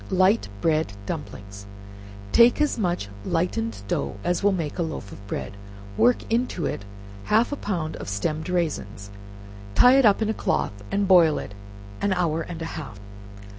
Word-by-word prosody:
Light 190 - +3
Bread 155 -7 +1
Dumplings 100 0 -7 0.6
Take 235 +3 +6
as 300 -5 +1
much 175 - -1 0.2
lightened 115 - -2
dough - - -2
as 175 -1 0
will 205 0 +4
make 165 -3 -3
a - - +2
loaf 160 -11 -4
of 100 +1 -12
bread, 100 - -5 0.4
work 245 0 +3
into 230 - 0
it 100 - -3 0.4
half 225 +5 +3
a - - -1
pound 170 - -3
of - - -7
stemmed 155 - -2
raisins, 105 - -2 0.6
tie 255 +2 +7
it 270 - +4
up 200 - +4
in 220 -1 0
a - - +1
cloth, 70 - -1 0.2
and 200 0 0
boil 170 -5 +6
it 100 - -6 0.5
an 200 - +2
hour 165 -3 0
and 165 0 -6
a 165 - -5
half. 110 -9 -10
165 Hz, 170 wpm, -24 LUFS, -, 0.6 s, tie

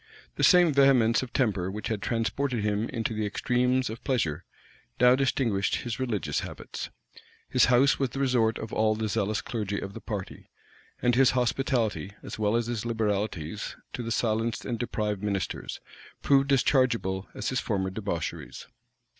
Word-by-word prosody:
The - - -2
same 175 -4 +6
vehemence 130 -4 +5
of 130 -2 -6
temper 100 -9 0
which 105 +2 -5
had 110 -3 -2
transported 120 +1 -1
him 105 +1 0
into 115 0 -2
the 110 0 -2
extremes 125 +4 +1
of 110 +2 -7
pleasure, 120 - 0 0.6
now 125 0 +7
distinguished 120 -6 +1
his 120 -1 -4
religious 115 - -1
habits. - - -7 0.6
His 125 -2 +4
house 125 +3 +4
was 135 -2 +1
the 135 - -6
resort 120 -5 +2
of 110 - -7
all 110 0 +2
the 110 0 -2
zealous 105 -1 -1
clergy 105 -3 -3
of 95 - -6
the - - -8
party; 100 -4 -6 0.5
and 125 - +4
his 130 +1 +5
hospitality, 120 -5 0
as - - -7
well 105 +1 +2
as 120 0 +1
his 115 -3 -3
liberalities 105 -8 -2 0.2
to - - -4
the 115 -1 -4
silenced 115 0 0
and 120 -3 -3
deprived 105 -4 -2
ministers, 100 -3 -3 0.4
proved 140 0 +3
as 135 -2 +4
chargeable 115 -8 +1
as 105 - -2
his 130 - 0
former 95 -4 -1
debaucheries. 95 -5 -4
115 Hz, 165 wpm, -27 LUFS, 105-125 Hz, 0.6 s, now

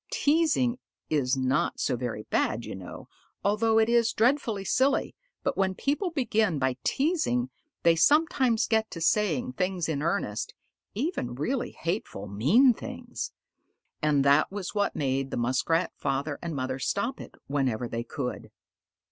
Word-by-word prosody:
Teasing 290 - +2 0.3
is 135 -3 +1
not 130 +1 0
so 130 - +1
very 120 -3 -4
bad, 115 +2 0
you - - -6
know, 95 -2 -9 0.4
although 220 +2 +2
it 220 0 +4
is 235 -1 +3
dreadfully 225 -4 +1
silly, 265 +7 +1 0.3
but - - 0
when 190 -1 +1
people 295 - 0
begin 220 - +1
by 130 -2 0
teasing 270 -5 0 0.3
they 170 -1 +5
sometimes 260 - +3
get 220 -1 +1
to 165 - -7
saying 165 -7 +1
things 185 +3 -1
in 150 -3 -1
earnest 160 - -2 0.4
even 225 - -2
really 240 - -2
hateful, 165 - -4
mean 160 - +4
things. 250 +1 -6 0.7
And 145 -3 +2
that 140 +5 +4
was 195 -2 -5
what 205 -1 0
made 135 -1 -1
the - - -4
Muskrat 130 +8 +1
father 140 +2 -2
and 170 -2 -4
mother 130 0 -2
stop 200 - -1
it - - -11
whenever 130 -4 -1
they 115 0 -3
could. 125 +1 -5
185 Hz, 150 wpm, -27 LUFS, -, 0.7 s, they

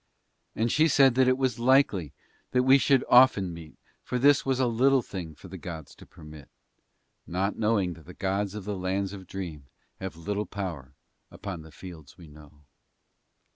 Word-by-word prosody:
And 115 +1 0
she 155 +2 +4
said 135 -3 +5
that 130 +1 +3
it 130 0 +3
was 130 -3 -1
likely 120 - +3 0.4
that 125 0 +3
we 135 +2 +6
should 135 -1 +3
often 110 -8 +5
meet 80 -2 -12 0.2
for 125 - -3
that 130 +3 +4
this 145 -1 +5
was 135 -1 -1
a 130 - +3
little 130 +2 +3
thing 85 -7 -7
for 85 - -13
the 95 0 -9
gods 80 -5 -8
to - - -16
permit 75 -3 -13 0.8
not 95 +4 -1
knowing 105 -5 0
that 80 -1 -16
the 90 - -11
gods 100 +1 -2
of 105 -3 -7
the 105 -1 -3
Lands 95 +1 -2
of 95 -2 -10
Dream 85 -8 -7 0.3
have 95 -2 -6
little 100 +4 -3
power 80 -9 -6 0.3
upon 95 -4 -7
the 80 0 -14
fields 80 -3 -12
we 85 - -13
know. 75 -1 -17
95 Hz, 185 wpm, -27 LUFS, 85-125 Hz, 0.8 s, we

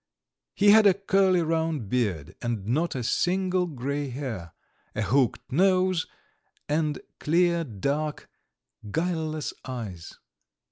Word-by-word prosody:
He 205 0 +6
had 215 0 +7
a 190 - +5
curly, 190 -2 +3
round 160 -6 -1
beard 100 - -1
and 115 -5 -2
not 150 +10 0
a 125 - -2
single 185 +6 +1
grey 140 -1 -3
hair 120 - -5 0.4
a 110 - 0
hooked 130 +2 +1
nose, 185 +2 +3 0.6
and 150 0 0 0.2
clear, 170 +1 +2
dark, 145 +5 -3 0.6
guileless 160 - -2
eyes. 110 -10 -7
155 Hz, 110 wpm, -26 LUFS, 125-180 Hz, 0.6 s, had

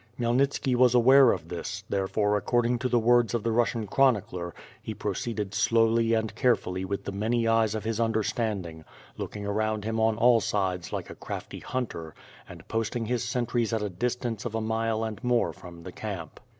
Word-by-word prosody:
Khmyelnitski 125 +2 +1
was 125 0 +4
aware 130 +1 +7
of - - -4
this; - - -5
therefore 105 +1 0
according 120 +3 +1
to 125 +1 -1
the 120 - +3
words 120 0 +3
of 115 - -1
the 115 - 0
Russian 115 -1 +1
chronicler, 100 -8 +1 0.3
he 110 - -6
proceeded 105 0 -3
slowly 115 +1 +3
and 110 -1 -1
carefully 105 -6 +1
with 100 +1 -3
the - - -4
many 115 +4 0
eyes 115 -1 +2
of 110 - -3
his 110 0 -2
understanding, 110 -7 -1 0.3
looking 105 -1 -6
around 110 +1 -1
him 110 0 -1
on 110 -1 +2
all 120 0 +5
sides 95 -4 -1
like - - -4
a - - -9
crafty - - -7
hunter, 95 -11 -5 0.3
and - - -12
posting 115 +1 -2
his 120 +1 -1
sentries 120 -1 -1
at 110 -2 0
a 105 - -2
distance 120 +3 -3
of 115 -2 -4
a - - 0
mile 110 0 -1
and 110 +2 -5
more 125 -1 +1
from 85 -2 -12
the 90 - -8
camp. 95 -6 -6
115 Hz, 185 wpm, -27 LUFS, 105-120 Hz, 0.3 s, aware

